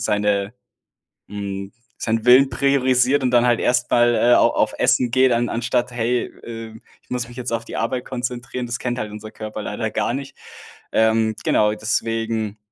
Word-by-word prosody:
seine, 105 Hz, 0 st, 0 dB, 0.8 s
hm, 100 Hz, -1 st, -5 dB, 0.3 s
seinen 115 Hz, -1 st, -1 dB
Willen 130 Hz, +2 st, +7 dB
priorisiert 135 Hz, -1 st, +2 dB
und 125 Hz, -, +2 dB
dann 120 Hz, 0 st, +4 dB
halt 120 Hz, -1 st, +3 dB
erst 125 Hz, 0 st, +1 dB
mal, 120 Hz, 0 st, +4 dB
äh, 120 Hz, 0 st, +4 dB
au -, -, +5 dB
auf -, -, 0 dB
Essen 125 Hz, -2 st, +3 dB
geht, 130 Hz, 0 st, +4 dB
an 120 Hz, 0 st, +1 dB
anstatt: 120 Hz, +1 st, -1 dB
„Hey, 120 Hz, +1 st, 0 dB, 0.2 s
ähm, 115 Hz, -1 st, -8 dB, 0.2 s
ich -, -, -34 dB
muss 125 Hz, -1 st, -2 dB
mich 120 Hz, +1 st, -13 dB
jetzt 125 Hz, -1 st, -4 dB
auf 115 Hz, -, -1 dB
die -, -, -8 dB
Arbeit 120 Hz, +2 st, -2 dB
konzentrieren.“ 125 Hz, 0 st, -4 dB
Das 120 Hz, +1 st, -3 dB
kennt 120 Hz, 0 st, -3 dB
halt 105 Hz, -1 st, -4 dB
unser 105 Hz, 0 st, -8 dB
Körper 110 Hz, 0 st, -7 dB
leider 110 Hz, +2 st, -3 dB
gar 110 Hz, +2 st, -1 dB
nicht. 135 Hz, 0 st, -7 dB, 0.6 s
Ähm, 110 Hz, 0 st, +2 dB
genau, 105 Hz, 0 st, +3 dB
deswegen, 110 Hz, 0 st, -2 dB
120 Hz, 180 wpm, -21 LUFS, 110-125 Hz, 0.8 s, Willen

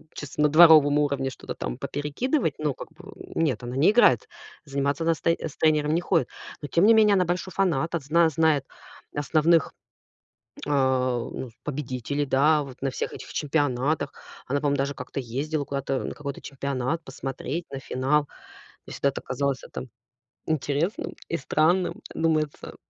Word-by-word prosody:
чисто 150 Hz, 0 st, -6 dB
на 150 Hz, -, +5 dB
дворовом 155 Hz, -2 st, +7 dB
уровне 140 Hz, -2 st, 0 dB
что-то -, -, -8 dB
там -, -, -4 dB
поперекидывать. 155 Hz, -, -1 dB
Ну, 150 Hz, -3 st, -1 dB
как -, -, -9 dB
бы, 180 Hz, +5 st, -13 dB, 0.2 s
нет, 150 Hz, -9 st, 0 dB
она 120 Hz, +1 st, -5 dB
не 150 Hz, +8 st, +5 dB
играет. 240 Hz, +3 st, +4 dB, 0.4 s
Заниматься 140 Hz, +1 st, -1 dB
она 165 Hz, 0 st, +3 dB
с -, -, -14 dB
тэ 165 Hz, 0 st, +2 dB
с 150 Hz, -, -6 dB
тренером 155 Hz, -1 st, +2 dB
не 170 Hz, -, +2 dB
ходит. 175 Hz, -2 st, +1 dB, 0.3 s
Но, 145 Hz, -, -5 dB
тем 170 Hz, +7 st, +3 dB
не 230 Hz, -, +7 dB
менее, 215 Hz, -2 st, +5 dB
она 185 Hz, -2 st, +3 dB
большой 180 Hz, +2 st, -2 dB
фанат. 170 Hz, -5 st, 0 dB
От 165 Hz, -5 st, -2 dB
зна 165 Hz, +4 st, +4 dB
знает 155 Hz, -2 st, +2 dB, 0.5 s
основных, 155 Hz, +2 st, +2 dB, 0.9 s
а, 130 Hz, -3 st, +2 dB
ну, 130 Hz, -, -6 dB
с -, -, -27 dB
победителей. 140 Hz, 0 st, -3 dB
Да. 145 Hz, +3 st, +3 dB
Вот 135 Hz, -3 st, -11 dB
на 135 Hz, -, 0 dB
всех -, -, -4 dB
этих -, -, -9 dB
чемпионатах. 145 Hz, -1 st, 0 dB, 0.3 s
Она, 140 Hz, +2 st, 0 dB
по-моему, 145 Hz, -1 st, +1 dB
даже 140 Hz, +1 st, -1 dB
как-то 125 Hz, +1 st, -5 dB
ездила 140 Hz, +5 st, -3 dB
куда-то 140 Hz, -1 st, -2 dB
на -, -, -4 dB
какой-то 140 Hz, -2 st, -6 dB
чемпионат 140 Hz, +3 st, -3 dB
посмотреть 135 Hz, +4 st, -5 dB
на 135 Hz, -, -5 dB
финал. 135 Hz, +3 st, 0 dB, 0.6 s
Мне -, -, -9 dB
всегда 140 Hz, -, +1 dB
это 135 Hz, -, -5 dB
казалось, 135 Hz, +1 st, -2 dB
а, -, -, -13 dB
там, 130 Hz, -, -7 dB, 0.6 s
интересным 155 Hz, -, -1 dB, 0.2 s
и 170 Hz, -, 0 dB
странным. 170 Hz, +6 st, +1 dB
Думается, 155 Hz, -2 st, -1 dB
145 Hz, 170 wpm, -25 LUFS, 135-160 Hz, 0.9 s, дворовом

